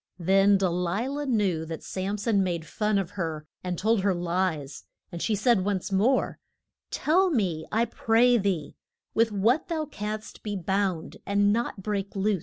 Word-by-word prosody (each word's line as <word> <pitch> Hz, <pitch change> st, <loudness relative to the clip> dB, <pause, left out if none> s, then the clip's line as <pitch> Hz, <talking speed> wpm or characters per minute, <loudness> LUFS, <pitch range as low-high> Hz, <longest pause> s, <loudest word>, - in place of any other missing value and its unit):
Then 195 Hz, +3 st, +4 dB
De 190 Hz, -1 st, +1 dB
li 180 Hz, +6 st, -1 dB
lah 290 Hz, +2 st, -3 dB
knew 205 Hz, -, +1 dB
that 160 Hz, 0 st, -6 dB
Sam 195 Hz, +2 st, -3 dB
son 205 Hz, -1 st, +1 dB
made 175 Hz, -4 st, -1 dB
fun 210 Hz, +3 st, 0 dB
of 195 Hz, -2 st, -2 dB
her 165 Hz, -6 st, -4 dB, 0.2 s
and 180 Hz, -1 st, -3 dB
told 220 Hz, +2 st, +2 dB
her 195 Hz, -1 st, +2 dB
lies, 170 Hz, -5 st, -2 dB, 0.3 s
and 170 Hz, -, -6 dB
she 220 Hz, -, +1 dB
said 210 Hz, -1 st, +3 dB
once 195 Hz, -1 st, -2 dB
more, 215 Hz, +8 st, +2 dB, 0.5 s
Tell 365 Hz, +5 st, +2 dB
me, 185 Hz, -, -1 dB
I 225 Hz, +2 st, +2 dB
pray 235 Hz, +1 st, +3 dB
thee, 190 Hz, -7 st, -1 dB, 0.4 s
with 225 Hz, 0 st, +3 dB
what 225 Hz, +8 st, +2 dB
thou 320 Hz, -3 st, -2 dB
canst 215 Hz, -6 st, -6 dB
be 210 Hz, -1 st, -4 dB
bound 190 Hz, -2 st, -1 dB
and 205 Hz, 0 st, +2 dB
not 225 Hz, -4 st, -2 dB
break 200 Hz, -1 st, -3 dB
loose. 200 Hz, 0 st, +1 dB
200 Hz, 175 wpm, -27 LUFS, 180-225 Hz, 0.5 s, Then